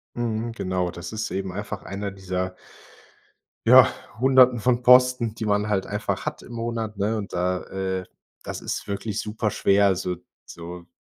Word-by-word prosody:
Mhm, 115 -1 -2
genau. 90 -5 -2
Das 85 +1 -8
ist 110 0 -3
eben 95 0 -3
einfach 100 0 -5
einer 100 +1 -4
dieser 95 -1 -4 1.1
ja, - - +8 0.3
hunderten 130 -1 +5
von 120 +2 +2
Posten, 125 -2 +5
die 110 - -4
man 105 0 +1
halt 95 -2 +1
einfach - - -3
hat - - -4
im - - -11
Monat, 115 -2 -3
ne, 105 +3 0
und 100 -2 -6
da, 90 +1 0
äh 95 -1 -3 0.4
das - - -5
ist - - -4
wirklich 100 +1 -3
super 105 0 -2
schwer, 100 +1 +3
also, 95 -2 +1 0.3
so 85 +1 -9
100 Hz, 165 wpm, -24 LUFS, 95-115 Hz, 1.1 s, ja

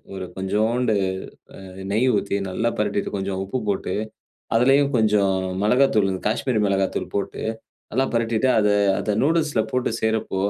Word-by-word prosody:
ஒரு 95 -1 -5
கொஞ்சோண்டு 110 +4 +1 0.7
அ - - -10 0.2
நெய் 115 +5 +2
ஊத்தி 100 0 -1
நல்லா 115 +5 0
பெரட்டிட்டு, 105 -1 -1
கொஞ்சம் 95 -1 -3
உப்பு 110 +7 -3
போட்டு 100 - -1 0.6
அதிலேயும் 135 +4 +4
கொஞ்சம் 105 -3 +3 0.3
மிளகாத்தூளு, 110 -5 +3
காஷ்மீரி 115 0 0
மிளகாத்தூள் 95 -1 -1
போட்டு 100 - -3 0.5
நல்லா 135 +3 +2
பெரட்டிட்டு, 115 +2 +1
அத 105 -1 +3 0.3
அத 105 -1 -1
நூடில்ஸ்ல 155 -6 +2
போட்டு 125 -3 0
செய்றப்போ 110 -3 0
110 Hz, 130 wpm, -23 LUFS, 100-125 Hz, 0.7 s, அதிலேயும்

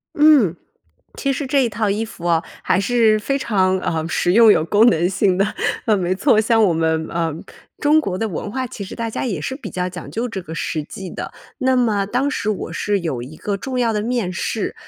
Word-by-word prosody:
嗯， 290 - +5 0.6
其 275 - 0
实 275 +1 -3
这 270 0 +2
一 235 - +1
套 215 0 -1
衣 210 +3 -1
服 195 -6 -8
啊， 165 -1 +2 0.2
还 - - +2
是 220 0 +3
非 275 +6 -1
常， 190 -7 +1
呃， 160 -2 -2
实 175 - +1
用 225 +2 +7
有 155 - +4
功 210 +6 +4
能 175 -5 +2
性 190 0 +1
的。 195 - +4 0.4
啊， 220 - +3
没 185 -1 0
错， 215 +2 +3
像 225 0 +3
我 185 - +3
们， 160 -1 0
呃， 165 -2 -1 0.5
中 300 +2 +4
国 190 -11 -3
的 225 - -1
文 200 +2 -5
化， 260 +3 -2
其 210 -4 -7
实 190 - -8
大 230 -1 -3
家 - - -3
也 190 -10 -2
是 260 - -3
比 270 - -8
较 180 0 -2
讲 180 0 -9
究 235 +3 -2
这 205 -4 -5
个 160 -1 -8
实 155 -1 -2
际 180 +4 -8
的。 - - -6 0.3
那 260 -2 +2
么 215 -5 +1
当 255 +6 0
时 215 - -3
我 210 - -4
是 205 -1 -1
有 155 -8 -3
一 140 +6 -10
个 200 +3 -3
重 255 +5 -4
要 235 -2 +2
的 210 - -1
面 230 -5 -1
试， 200 +3 -3
210 Hz, 250 characters per minute, -20 LUFS, 180-240 Hz, 0.6 s, 用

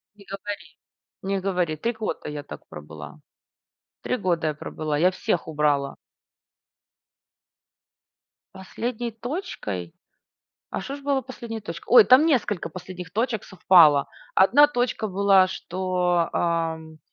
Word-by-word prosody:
Не 200 -1 -17
говори. 200 +1 -6 0.5
Не 195 0 -1
говори, 180 -4 -1
3 235 +10 -2
года 220 -7 -5
я 150 -1 -6
так - - -11
пробыла. 75 -1 -10 0.8
3 125 +1 -1
года 170 -3 0
я 155 - 0
пробыла, 150 0 -4
я 180 +2 +5
всех 180 -2 -2
убрала. 145 -3 0 2.6
Последней 230 +5 -5
точкой? 225 - -5 0.8
А - - -3
что 275 +8 -6
ж - - -12
было 280 -1 0
последней 235 -4 -7
точкой? 210 - -8
Ой, 470 -3 +10
там 260 +2 +6
несколько 220 - 0
последних 180 0 -9
точек 225 0 -1
совпало. 165 -6 +5 0.3
1 250 +10 +6
точка 245 -5 -1
была, 195 0 +4
что, 180 -2 -1
ам 160 -2 -2
185 Hz, 125 wpm, -24 LUFS, 160-225 Hz, 2.6 s, Ой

